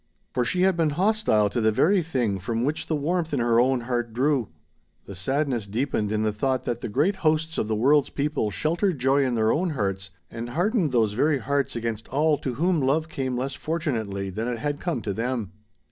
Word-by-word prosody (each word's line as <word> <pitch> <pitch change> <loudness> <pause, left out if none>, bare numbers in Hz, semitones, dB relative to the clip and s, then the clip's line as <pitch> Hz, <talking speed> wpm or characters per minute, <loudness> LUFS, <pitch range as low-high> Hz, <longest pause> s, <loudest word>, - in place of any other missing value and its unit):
For 125 - +1
she 180 +9 +1
had 190 -1 +4
been 165 -2 +2
hostile 180 - +2
to 120 - -1
the 110 0 +3
very 180 - +3
thing 125 - -1
from 115 +5 -2
which 150 +2 -2
the 160 - 0
warmth 160 +1 -1
in - - 0
her 115 -1 +3
own 130 0 +3
heart 120 -1 -2
drew. 130 -2 +1 0.6
The 100 - -8
sadness 125 - -1
deepened 110 -1 -1
in 110 0 0
the 110 - +1
thought 130 +4 0
that 120 -1 -3
the - - -4
great 155 - +1
hosts 160 -1 0
of - - -1
the 110 - 0
world's 140 +6 +3
people 145 -6 -1
sheltered 165 - 0
joy 135 +2 +3
in 125 -2 0
their 110 -1 +2
own 180 +3 +1
hearts 95 -9 -2 0.2
and 115 +1 -5
hardened 175 - +1
those 110 -4 +2
very 145 +6 +2
hearts 140 0 -1
against 115 -2 -3
all 150 +2 +2
to 130 -3 -3
whom 170 +2 +1
love 155 +4 +1
came 130 -5 -2
less 135 +2 -2
fortunately 115 - -3
than 110 +5 -3
it 120 -1 -2
had 145 +5 -3
come 165 -10 -2
to 100 - -2
them. 115 -2 -2
130 Hz, 215 wpm, -25 LUFS, 115-155 Hz, 0.6 s, had